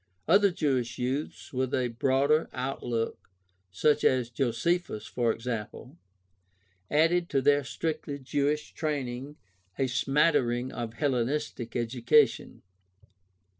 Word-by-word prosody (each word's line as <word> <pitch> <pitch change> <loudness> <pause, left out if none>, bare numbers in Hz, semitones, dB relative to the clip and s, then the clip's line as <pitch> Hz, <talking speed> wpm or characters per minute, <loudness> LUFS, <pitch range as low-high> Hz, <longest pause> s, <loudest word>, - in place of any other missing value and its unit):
Other 200 +4 +5
Jewish 130 -8 -1
youths 130 +5 -3
with 130 0 0
a 125 -1 0
broader 135 +6 +2
outlook, 125 -3 -3 0.4
such 150 +11 +2
as 125 -2 +2
Josephus, 130 +2 -1
for 120 -2 0
example, 115 +3 -5 0.9
added 165 +3 +2
to 135 - +2
their 145 +1 +3
strictly 145 +3 -3
Jewish 145 +2 -1
training 140 -2 -3 0.4
a 135 - +1
smattering 130 -2 +1
of 115 -1 -5
Hellenistic 135 -2 -1
education. 120 0 +2
130 Hz, 100 wpm, -28 LUFS, 120-150 Hz, 0.9 s, Other